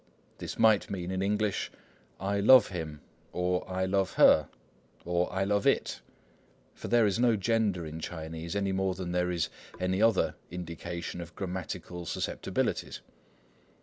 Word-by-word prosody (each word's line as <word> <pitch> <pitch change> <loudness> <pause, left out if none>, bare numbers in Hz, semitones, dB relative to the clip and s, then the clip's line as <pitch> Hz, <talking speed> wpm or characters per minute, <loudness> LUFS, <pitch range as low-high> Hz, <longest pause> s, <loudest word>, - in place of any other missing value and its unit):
This - - -6
might 110 -3 +4
mean 90 -2 -4
in 95 0 -1
English, 105 0 0 0.5
"I 100 +1 -1
love 115 +3 +7
him," 80 -5 -5 0.3
or 90 +1 -1
"I 95 0 0
love 95 0 0
her," - - +6 0.6
or 90 +1 0
"I 95 - 0
love 100 +1 +1
it,"—for - - -4
there 120 -2 +4
is 105 +2 +1
no 120 -2 +4
gender 105 -4 +1
in 80 +1 -6
Chinese, 80 +1 -6
any 100 -1 0
more 95 -1 0
than 90 -2 -4
there 90 0 +1
is 85 -2 -1 0.3
any 95 +2 0
other 115 -3 +3 0.2
indication 85 0 -5
of 85 0 -10
grammatical 90 -2 -5
susceptibilities. - - -2
95 Hz, 145 wpm, -30 LUFS, 85-100 Hz, 0.6 s, love